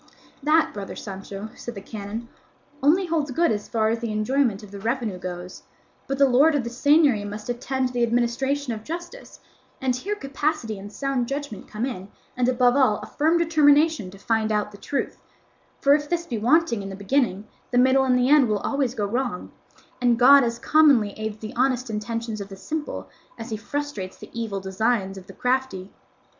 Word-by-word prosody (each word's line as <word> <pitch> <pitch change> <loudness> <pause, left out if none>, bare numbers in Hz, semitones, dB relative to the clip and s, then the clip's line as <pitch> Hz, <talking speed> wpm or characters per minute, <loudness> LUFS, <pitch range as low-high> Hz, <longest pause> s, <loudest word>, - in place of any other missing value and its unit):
"That, 315 +2 +3
brother 200 -1 -6
Sancho," 195 +1 -7
said 240 - -8
the - - -5
canon, 215 +3 -6 0.5
"only 325 +8 +4
holds 320 -4 -1
good 330 +4 +2
as 210 -1 -2
far 220 -2 +1
as 225 +1 0
the 230 -2 -3
enjoyment 220 0 0
of 205 - -12
the 200 - -8
revenue 225 -3 -2
goes; 180 0 -7 0.5
but 275 - -2
the 275 0 +5
lord 280 +5 +4
of 280 - +1
the 235 - -5
seigniory 285 -3 +4
must 210 +2 -7
attend 255 +2 -1
to - - -11
the 245 - -1
administration 245 +3 0
of 215 -1 -7
justice, 345 - -8 0.4
and 260 -2 0
here 400 +12 -3
capacity 275 - -2
and 205 +1 -9
sound 265 0 -1
judgment 275 -7 -5
come 215 +3 -3
in, 195 -8 -5 0.3
and 250 0 +2
above 250 0 +3
all 255 -7 +4
a - - -7
firm 315 +3 +1
determination 310 - +3
to 195 - -13
find 220 +2 0
out 210 -1 0
the 200 - -13
truth; 280 - -3 0.6
for 280 - +5
if 295 0 0
this 340 -1 -1
be 235 -8 -3
wanting 250 -1 +3
in 195 - -6
the 195 - -6
beginning, 205 -1 0 0.2
the 245 - 0
middle 260 +2 +5
and 255 -1 +3
the 250 0 +2
end 285 -2 +6
will 210 - +2
always 270 +2 -1
go 210 - -1
wrong; 240 -2 -3 0.5
and 240 -1 +3
God 275 +3 +8
as 235 -1 -1
commonly 275 -8 +4
aids 215 -1 -4
the 215 0 -8
honest 255 -1 +1
intentions 225 0 -4
of 200 - -7
the 195 - -9
simple 305 +9 -5 0.3
as 225 0 -8
he - - -1
frustrates 220 -5 -5
the - - -12
evil 225 -4 -3
designs 195 +1 -1
of 190 -1 -11
the - - -11
crafty." 250 -7 -1
245 Hz, 200 wpm, -24 LUFS, 210-280 Hz, 0.6 s, God